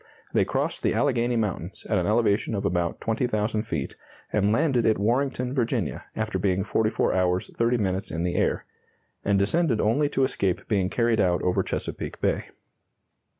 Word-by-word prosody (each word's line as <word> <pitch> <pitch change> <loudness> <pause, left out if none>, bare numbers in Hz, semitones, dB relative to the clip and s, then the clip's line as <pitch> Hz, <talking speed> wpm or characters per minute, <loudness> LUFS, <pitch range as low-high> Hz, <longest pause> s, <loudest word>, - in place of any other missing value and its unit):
They - - +3
crossed - - -2
the - - +1
Alleghany 125 -3 +1
Mountains 100 -5 -3
at 105 -3 +2
an 90 - -1
elevation 110 -1 +2
of 100 - -2
about 85 -1 0
20,000 110 -1 0
feet, 80 -11 -4 0.4
and 105 0 +2
landed 125 +1 +2
at 110 - +3
Warrenton, 125 +3 0
Va., 120 - -1
after 110 -3 -2
being 95 0 +1
44 110 +2 +1
hours 90 0 0
30 120 +1 +2
minutes 95 -2 -1
in 80 +2 -3
the 90 0 0
air; - - 0 0.6
and 100 0 +2
descended 120 - +2
only 140 +7 +2
to 135 - +1
escape 95 -8 -1
being 95 -4 +1
carried 115 -1 +2
out 90 -1 +1
over 90 - +2
Chesapeake - - -4
Bay. - - 0
110 Hz, 165 wpm, -26 LUFS, 95-120 Hz, 0.6 s, They